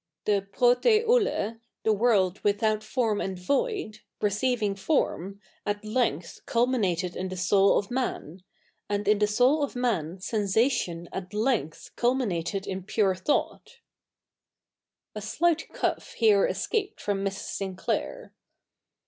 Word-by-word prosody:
The 200 -2 +1
TrpwTr] 255 - +4
vXtj, 435 - +1 0.2
the 220 - +3
world'"'' 205 -4 +2
without 215 +1 +2
fortn 215 -1 -1
and 190 -1 -4
void^'' 275 - -1 0.2
receiving 210 +1 0
form, 195 - -1 0.2
at 205 +1 -3
length 215 - -1
culminated 200 -8 +1
in 185 0 -3
the 185 - -6
soul 195 +2 +4
of 200 - -2
inati; 245 - -3 0.5
and 205 0 -1
i7i 210 0 +3
the 210 - +3
soul 250 +8 +3
of 280 - -3
man 200 -9 -1
seiisation 205 -3 0
at 190 +2 -6
length 215 - -1
cul??ii?iated 200 -7 0
ifi 190 0 -5
pure 205 -3 +2
thought,^ 185 +11 -2 1.4
A 210 - -6
slight 325 +9 0
cough - - -2
here 210 -4 +4
escaped 410 -4 -2
from 200 -1 -2
Mrs. 195 0 -4
Sinclair. 195 - -3
210 Hz, 125 wpm, -27 LUFS, 195-245 Hz, 1.4 s, TrpwTr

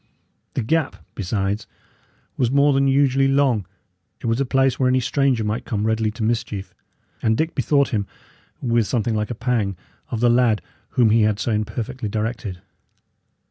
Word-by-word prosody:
The 130 - 0
gap, 160 +5 0 0.2
besides, 100 +1 -2 0.7
was 125 -3 +1
more 140 +2 +4
than 135 0 +3
usually 135 0 +3
long; 135 -8 +2 0.5
it - - -9
was 115 +3 +1
a - - +1
place 135 0 +2
where 130 -1 +3
any 130 0 +3
stranger 130 -2 +1
might 105 +2 -2
come 105 -2 -2
readily 110 0 +1
to 115 - -5
mischief; 110 -5 -2 0.5
and 110 0 +2
Dick 160 +3 0
bethought 140 -2 +2
him, 100 -3 -1 0.6
with 115 -3 +2
something 115 -2 0
like 105 -1 -1
a 120 - -3
pang, 110 -5 -1 0.3
of 115 - -3
the 120 - +3
lad 120 -3 +3 0.3
whom 115 -4 +5
he 115 +1 +4
had 105 -1 +2
so 120 - -1
imperfectly 110 +3 -3
directed. 105 -4 -3
115 Hz, 170 wpm, -22 LUFS, 110-130 Hz, 0.7 s, whom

